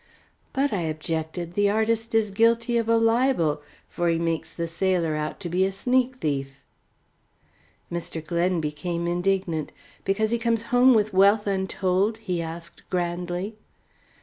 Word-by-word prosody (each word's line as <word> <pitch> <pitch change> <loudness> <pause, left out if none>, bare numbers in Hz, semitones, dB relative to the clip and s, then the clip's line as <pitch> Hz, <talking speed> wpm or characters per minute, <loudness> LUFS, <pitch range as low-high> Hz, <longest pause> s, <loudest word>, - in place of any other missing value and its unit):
"But," 275 -1 0
I 190 - 0
objected, 160 +2 -3
"the 205 +1 +3
artist 225 +2 0
is 215 -2 +2
guilty 230 +3 +2
of 230 -1 -2
a 230 - +5
libel, 225 - +2 0.3
for 175 0 -1
he 165 - +2
makes 165 -1 -2
the 170 -1 -3
sailor 170 -2 0
out 150 0 -3
to 180 - -4
be 180 +2 +1
a 190 - +1
sneak 250 +5 +1
thief." 140 - -3 1.3
Mr. 170 -2 -4
Glen 170 +2 +1
became 170 +3 -3
indignant. 175 -2 0 0.3
"Because 215 +3 0
he 235 - +1
comes 230 -1 0
home 250 0 +6
with 215 -1 +2
wealth 200 +3 +5
untold?" 190 +1 0
he 180 -6 -3
asked 165 +1 -7
grandly. 180 +3 -2
185 Hz, 150 wpm, -25 LUFS, 170-220 Hz, 1.3 s, home